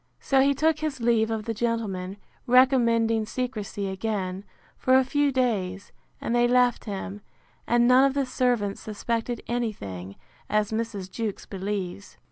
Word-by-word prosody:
So 270 Hz, -1 st, +3 dB
he 280 Hz, +1 st, +3 dB
took 310 Hz, +2 st, +2 dB
his 305 Hz, -4 st, -3 dB
leave 230 Hz, -2 st, +2 dB
of 220 Hz, -1 st, -3 dB
the 230 Hz, -, -2 dB
gentlemen, 205 Hz, -5 st, -2 dB, 0.3 s
recommending 230 Hz, -3 st, +4 dB
secrecy 215 Hz, -5 st, -3 dB
again, 190 Hz, -1 st, -3 dB, 0.3 s
for 255 Hz, -, +3 dB
a 265 Hz, -, +4 dB
few 290 Hz, +2 st, +1 dB
days, 205 Hz, -7 st, -1 dB, 0.3 s
and 230 Hz, -, -2 dB
they 240 Hz, 0 st, +4 dB
left 245 Hz, -1 st, +3 dB
him; 200 Hz, -1 st, -5 dB, 0.5 s
and 240 Hz, 0 st, +4 dB
none 255 Hz, +2 st, +6 dB
of 275 Hz, 0 st, +1 dB
the 280 Hz, -1 st, +1 dB
servants 245 Hz, -5 st, 0 dB
suspected 230 Hz, +2 st, -3 dB
any 240 Hz, -2 st, 0 dB
thing, 95 Hz, -, -8 dB, 0.3 s
as 210 Hz, 0 st, +1 dB
Mrs. 220 Hz, -4 st, -3 dB
Jewkes 220 Hz, -2 st, -4 dB
believes. 195 Hz, -1 st, -5 dB
230 Hz, 150 wpm, -26 LUFS, 200-250 Hz, 0.5 s, none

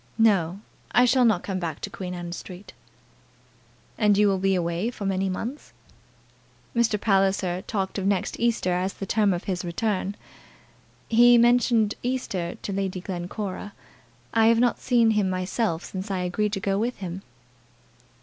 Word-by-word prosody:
"No; 200 Hz, -5 st, +2 dB, 0.3 s
I 245 Hz, +2 st, +6 dB
shall 250 Hz, 0 st, +4 dB
not 215 Hz, -6 st, +2 dB
come 190 Hz, -2 st, -3 dB
back 165 Hz, -4 st, -4 dB
to -, -, -4 dB
Queen 180 Hz, -2 st, -6 dB
Anne 175 Hz, -1 st, -6 dB
Street." 185 Hz, +2 st, -9 dB, 1.3 s
"And 210 Hz, -3 st, +4 dB
you 210 Hz, 0 st, +5 dB
will 195 Hz, -1 st, +1 dB
be 195 Hz, 0 st, +2 dB
away 170 Hz, +4 st, -1 dB
for 225 Hz, -4 st, -7 dB
many 195 Hz, 0 st, 0 dB
months?" 235 Hz, +10 st, -5 dB, 1.0 s
"Mr. 230 Hz, -3 st, +2 dB
Palliser 195 Hz, -3 st, +1 dB
talked 195 Hz, -1 st, -3 dB
of 195 Hz, -, -1 dB
next 200 Hz, -2 st, -1 dB
Easter 230 Hz, -6 st, +1 dB
as 185 Hz, +2 st, -1 dB
the 195 Hz, -, -6 dB
term 210 Hz, 0 st, +2 dB
of 175 Hz, 0 st, -2 dB
his 185 Hz, -2 st, -3 dB
return. 195 Hz, +2 st, -2 dB, 0.9 s
He 240 Hz, +1 st, +6 dB
mentioned 235 Hz, -2 st, +4 dB
Easter 220 Hz, -9 st, -2 dB
to 200 Hz, -, -3 dB
Lady 190 Hz, -1 st, -2 dB
Glencora. 190 Hz, +2 st, -5 dB, 0.6 s
I 225 Hz, -1 st, +4 dB
have 230 Hz, 0 st, +4 dB
not 245 Hz, 0 st, +2 dB
seen 235 Hz, -3 st, +3 dB
him 210 Hz, -3 st, +1 dB
myself 185 Hz, -1 st, -1 dB
since 190 Hz, +2 st, -6 dB
I 190 Hz, -2 st, -1 dB
agreed 205 Hz, +4 st, -1 dB
to 195 Hz, -, -1 dB
go 195 Hz, +1 st, 0 dB
with 240 Hz, +3 st, -1 dB
him." 185 Hz, -1 st, -6 dB
195 Hz, 160 wpm, -25 LUFS, 185-225 Hz, 1.3 s, I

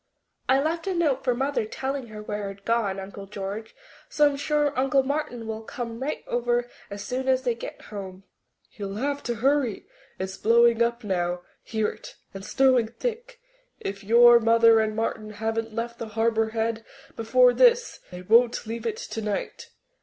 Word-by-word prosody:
"I 265 Hz, +1 st, +5 dB
left 325 Hz, +5 st, -1 dB
a 380 Hz, -, 0 dB
note 295 Hz, -6 st, +1 dB
for 250 Hz, -2 st, +1 dB
Mother 270 Hz, 0 st, 0 dB
telling 265 Hz, +4 st, -4 dB
her 215 Hz, -1 st, -9 dB
where 210 Hz, -1 st, -4 dB
I'd 195 Hz, 0 st, -12 dB
gone, 220 Hz, -4 st, 0 dB
Uncle 195 Hz, +1 st, -8 dB
George, 205 Hz, +2 st, -6 dB, 0.3 s
so 300 Hz, -1 st, +4 dB
I'm -, -, -4 dB
sure 295 Hz, 0 st, 0 dB
Uncle 270 Hz, +1 st, +2 dB
Martin 265 Hz, -4 st, -3 dB
will 220 Hz, 0 st, -5 dB
come 230 Hz, 0 st, -6 dB
right 275 Hz, +4 st, -3 dB
over 240 Hz, 0 st, 0 dB, 0.2 s
as 200 Hz, 0 st, -6 dB
soon 260 Hz, +3 st, -3 dB
as 260 Hz, 0 st, +2 dB
they 245 Hz, -2 st, +1 dB
get 230 Hz, -, -8 dB
home." 195 Hz, -2 st, -8 dB, 0.5 s
"He'll 200 Hz, -2 st, -6 dB
have 280 Hz, +5 st, -2 dB
to 240 Hz, -, -3 dB
hurry. 260 Hz, -1 st, +1 dB, 0.3 s
It's 190 Hz, 0 st, -5 dB
blowing 235 Hz, +1 st, +4 dB
up 235 Hz, 0 st, +1 dB
now... 175 Hz, -3 st, -1 dB, 0.2 s
hear 220 Hz, -1 st, -1 dB
it... -, -, -11 dB, 0.2 s
and 195 Hz, 0 st, -8 dB
snowing 255 Hz, +1 st, +3 dB
thick. 485 Hz, -, -5 dB, 0.4 s
If 200 Hz, +1 st, -5 dB
your 235 Hz, +3 st, +7 dB
mother 230 Hz, 0 st, +5 dB
and 215 Hz, -1 st, 0 dB
Martin 215 Hz, -1 st, -3 dB
haven't 225 Hz, +1 st, -3 dB
left 235 Hz, 0 st, -4 dB
the 230 Hz, -, -5 dB
Harbour 225 Hz, 0 st, +1 dB
Head 225 Hz, 0 st, -2 dB, 0.3 s
before 245 Hz, +2 st, +4 dB
this, 485 Hz, -, +3 dB
they 180 Hz, 0 st, -9 dB
won't 235 Hz, +4 st, +4 dB
leave 230 Hz, +1 st, -4 dB
it 220 Hz, -1 st, -2 dB
tonight. 215 Hz, -2 st, -4 dB
230 Hz, 175 wpm, -25 LUFS, 215-260 Hz, 0.5 s, your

